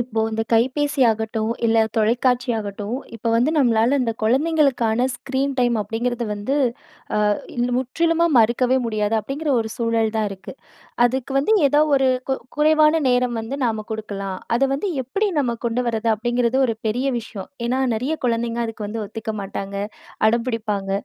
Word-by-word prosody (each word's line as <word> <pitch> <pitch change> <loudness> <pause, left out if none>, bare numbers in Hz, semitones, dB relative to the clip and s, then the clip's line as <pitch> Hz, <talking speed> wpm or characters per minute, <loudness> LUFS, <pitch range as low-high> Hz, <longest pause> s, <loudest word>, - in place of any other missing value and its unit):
இப்போ 235 -2 -2
இந்த 220 0 -1
கைபேசி 265 +5 +2
ஆகட்டும், 220 0 -2 0.2
இல்ல 225 0 +4
தொலைக்காட்சி 245 +3 +2
ஆகட்டும் 205 +2 -4 0.2
இப்ப 230 0 -2
வந்து 240 +6 +3
நம்மளால 240 -1 +3
இந்த 235 -2 0
குழந்தைங்களுக்கான 255 -2 +2
ஸ்க்ரீன் 270 +2 -2
டைம் 240 -1 +2
அப்படிங்கிறது 235 +3 -2
வந்து 210 +7 -2 0.6
ஆ - - +2 0.6
முற்றிலுமா 330 +6 +1
மறுக்கவே 240 +3 +3
முடியாது. 215 -1 0
அப்படிங்கிற 285 +8 -3
ஒரு 220 - -3
சூழல் 230 -2 +1
தான் 215 -1 +1
இருக்கு. 190 -2 -9 0.5
அதுக்கு 260 +2 -3
வந்து 300 +11 +2
ஏதோ 290 +2 +3 0.2
ஒரு 270 -1 +3 0.2
கு - - +3 0.2
குறைவான 310 +1 +4
நேரம் 245 -1 +1
வந்து 225 +5 -5
நாம 220 -3 -1
குடுக்கலாம், 200 -3 -4 0.2
அத 250 - -2
வந்து 300 +9 -2
எப்டி 390 - -1
நம்ம 245 -5 0
கொண்டு 240 +2 0
வர்றது? 225 0 -1
அப்டிங்கிறது 240 +3 0
ஒரு 230 -2 -2
பெரிய 245 +5 -1
விஷயம். 210 -4 -8 0.2
ஏனா 255 +2 0
நெறைய 260 +8 -1
குழந்தைங்க 235 0 -1
அதுக்கு 220 -2 -6
வந்து 220 +2 -4
ஒத்துக்க 220 +1 -5
மாட்டாங்க, 195 0 -5 0.5
அடம்பிடிப்பாங்க. 220 -4 -1
235 Hz, 150 wpm, -21 LUFS, 220-260 Hz, 0.6 s, இல்ல